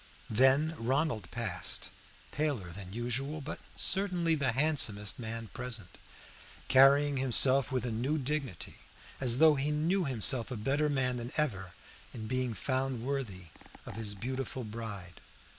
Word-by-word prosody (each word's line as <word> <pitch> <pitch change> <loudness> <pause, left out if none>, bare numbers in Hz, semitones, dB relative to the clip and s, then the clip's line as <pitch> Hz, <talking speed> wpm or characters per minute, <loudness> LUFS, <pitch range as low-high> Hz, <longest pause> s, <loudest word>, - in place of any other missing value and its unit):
Then 135 +7 +4
Ronald 120 - -1
passed, 110 -7 -1 0.4
paler 140 - -2
than 95 +1 -7
usual, 125 +7 -2
but 150 +1 -6 0.2
certainly 180 -4 +2
the 140 -6 0
handsomest 130 -8 +1
man 115 -1 -5
present, 115 -7 -5 0.7
carrying 140 +2 +5
himself 130 +1 +5
with 130 -2 -1
a 120 - -2
new 130 +8 -1
dignity, 135 - -4 0.4
as 125 -2 +2
though 160 +1 +7
he 140 +1 -1
knew 165 +5 +1
himself 125 -2 +1
a 125 - -4
better 140 +7 0
man 130 -3 0
than 120 +1 -6
ever 95 - -1 0.4
in 110 -2 -6
being 125 -1 -2
found 130 -2 -2
worthy 110 -11 -4 0.4
of - - -8
his 105 -2 -4
beautiful 130 +4 -4
bride. 105 -6 -8
130 Hz, 140 wpm, -31 LUFS, 110-140 Hz, 0.7 s, though